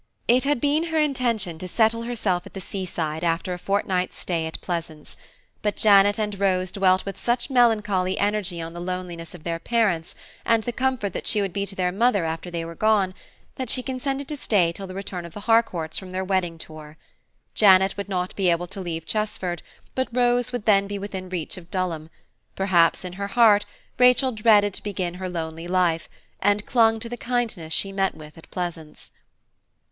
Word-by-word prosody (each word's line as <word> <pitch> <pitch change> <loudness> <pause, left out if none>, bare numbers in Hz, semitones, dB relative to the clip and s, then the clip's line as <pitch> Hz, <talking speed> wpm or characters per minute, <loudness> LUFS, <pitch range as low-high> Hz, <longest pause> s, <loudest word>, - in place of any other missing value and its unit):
It 250 +3 +4
had 290 -2 +2
been 295 +5 +2
her 320 -1 -2
intention 235 - 0
to 185 - -6
settle 225 +4 +2
herself 215 -7 -1
at - - -15
the - - -4
sea 190 0 -5
side 160 -2 -3
after 170 +2 0
a 180 - -6
fortnight's 190 -2 -1
stay 165 -3 -2
at 160 - -6
Pleasance; 165 -4 -5 0.5
but 210 -1 0
Janet 205 -1 +5
and 210 -2 -2
Rose 185 -2 +1
dwelt 185 -1 +2
with 195 - -6
such 240 +3 0
melancholy 210 -7 +2
energy 200 -4 0
on 165 0 -6
the 175 - -7
loneliness 175 -2 -5
of 165 - -13
their 165 -1 -2
parents, 200 -7 0 0.3
and 230 -1 +2
the 240 - -2
comfort 250 -6 -1
that - - -5
she 215 - +2
would 195 -3 -1
be 200 0 -2
to 195 - -7
their 180 -1 0
mother 205 -2 +2
after 165 +2 -4
they 170 -1 -4
were 165 - -7
gone, 200 0 +2 0.4
that 260 -3 -4
she 255 - 0
consented 270 +1 -3
to 300 - -4
stay 190 -10 +2
till 195 +3 -8
the 185 - -8
return 190 -2 -5
of 170 -1 -11
the 205 - -6
Harcourts 200 -9 +1
from 190 - -10
their 185 +1 -3
wedding 185 -3 -1
tour. 155 -1 -11 0.6
Janet 190 -2 +5
would 200 0 -5
not 180 -1 -2
be 190 -3 +2
able 170 +1 +1
to 190 +2 -8
leave 165 -3 -4
Chesford, 190 -5 -2 0.3
but 260 0 0
Rose 245 0 +2
would 245 -4 -4
then 200 -2 +4
be 205 0 -4
within 195 -2 -6
reach 180 +1 -4
of 175 -1 -12
Dulham; 170 -5 -2 0.5
perhaps 185 -2 +3
in 180 - -6
her 200 +2 -4
heart 210 -1 +5 0.3
Rachel 250 +1 +5
dreaded 210 -3 +4
to - - -4
begin 185 -4 -3
her 185 - -3
lonely 165 -1 -5
life, 175 -3 +1 0.3
and 205 +1 +2
clung 225 -3 +3
to 230 - -4
the 240 - -5
kindness 230 -10 -2
she 195 +4 0
met 195 0 0
with 150 -1 -12
at 165 - -15
Pleasance. 165 -4 -6
195 Hz, 200 wpm, -24 LUFS, 175-220 Hz, 0.6 s, Janet